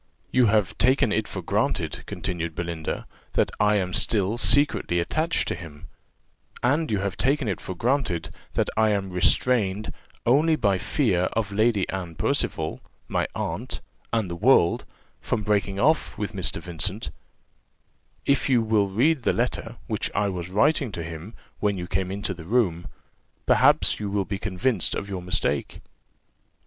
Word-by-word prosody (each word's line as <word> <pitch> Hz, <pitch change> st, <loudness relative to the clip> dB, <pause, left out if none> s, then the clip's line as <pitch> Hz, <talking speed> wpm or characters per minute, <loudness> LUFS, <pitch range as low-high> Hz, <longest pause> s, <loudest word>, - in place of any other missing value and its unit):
"You 125 Hz, -2 st, +4 dB
have 105 Hz, -4 st, +1 dB
taken 130 Hz, -1 st, +4 dB
it 110 Hz, 0 st, 0 dB
for -, -, -6 dB
granted," -, -, -1 dB
continued 85 Hz, -4 st, -4 dB
Belinda, 85 Hz, -2 st, -4 dB, 0.3 s
"that -, -, +2 dB
I 105 Hz, 0 st, +4 dB
am 90 Hz, -2 st, 0 dB
still 105 Hz, +1 st, +2 dB
secretly 140 Hz, -11 st, +3 dB
attached 155 Hz, -, 0 dB
to -, -, 0 dB
him; 80 Hz, -4 st, -10 dB, 0.8 s
and 145 Hz, +6 st, +2 dB
you 100 Hz, -2 st, 0 dB
take 140 Hz, +3 st, +1 dB
it 100 Hz, -7 st, -2 dB
for 95 Hz, -, -5 dB
granted 115 Hz, -, 0 dB, 0.2 s
that -, -, 0 dB
I 110 Hz, 0 st, +4 dB
am 100 Hz, -2 st, -1 dB
restrained 105 Hz, +2 st, +2 dB, 0.3 s
only 150 Hz, +7 st, +4 dB
by 100 Hz, -9 st, +1 dB
fear 95 Hz, -, +1 dB
of 110 Hz, -3 st, -1 dB
Lady 110 Hz, -1 st, +2 dB
Anne 90 Hz, -4 st, -4 dB
Percival, 80 Hz, 0 st, -1 dB, 0.3 s
my -, -, 0 dB
aunt, -, -, -3 dB, 0.3 s
and 110 Hz, -4 st, +1 dB
the 85 Hz, -, -5 dB
world, 100 Hz, -3 st, +4 dB, 0.3 s
from 110 Hz, -3 st, -2 dB
breaking 100 Hz, -2 st, 0 dB
off 155 Hz, +8 st, +2 dB
with 105 Hz, 0 st, -3 dB
Mr. 95 Hz, -3 st, -1 dB
Vincent: 95 Hz, +5 st, -3 dB, 1.1 s
if 140 Hz, 0 st, +2 dB
you 120 Hz, -3 st, +4 dB
will 110 Hz, -3 st, +2 dB
read 135 Hz, +9 st, +2 dB
the -, -, +2 dB
letter, -, -, -2 dB
which -, -, -2 dB
I 105 Hz, 0 st, +2 dB
was 90 Hz, -2 st, -4 dB
writing 135 Hz, +5 st, +2 dB
to 85 Hz, -, -4 dB
him 85 Hz, +6 st, -8 dB, 0.2 s
when 100 Hz, -2 st, +1 dB
you 90 Hz, -, -4 dB
came 95 Hz, +1 st, -1 dB
into 100 Hz, 0 st, -2 dB
the 85 Hz, -3 st, -10 dB
room, 90 Hz, -6 st, +1 dB, 0.6 s
perhaps -, -, +4 dB
you 105 Hz, -1 st, -3 dB
will 100 Hz, -1 st, 0 dB
be 100 Hz, 0 st, -4 dB
convinced 100 Hz, +1 st, 0 dB
of 100 Hz, -, -4 dB
your 95 Hz, -2 st, -4 dB
mistake." 90 Hz, +1 st, -1 dB
100 Hz, 155 wpm, -25 LUFS, 90-120 Hz, 1.1 s, You